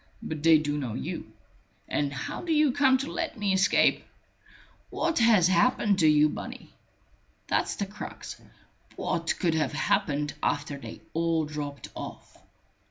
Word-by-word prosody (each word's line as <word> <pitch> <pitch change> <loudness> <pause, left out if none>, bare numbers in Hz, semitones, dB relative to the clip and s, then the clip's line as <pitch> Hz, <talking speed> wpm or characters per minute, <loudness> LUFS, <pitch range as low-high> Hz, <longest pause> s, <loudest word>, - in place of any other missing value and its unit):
But 155 -2 -5
they 165 0 +7
do 150 -1 -2
know 125 -6 -4
you; 65 - -5 0.6
and 145 -1 -1
how 140 0 -5
do 345 - -3
you 305 -3 +4
come 265 0 +4
to 275 +3 -5
let 330 -6 -3
me 205 -2 +1
escape? 190 +1 +3 0.9
What 330 -3 0
has 220 -7 +5
happened 200 +1 +3
to 160 - +5
you, 150 0 +5
Bunny? - - -8 0.7
That's - - 0
the 200 - -2
crux. 200 +2 -8 0.5
What - - -1
could 170 -4 +1
have 160 -1 0
happened 150 -7 0
after 145 -1 -1
they - - -9
all 165 -1 +1
dropped 145 -1 -6
off?" - - -9
165 Hz, 150 wpm, -27 LUFS, 150-210 Hz, 0.9 s, they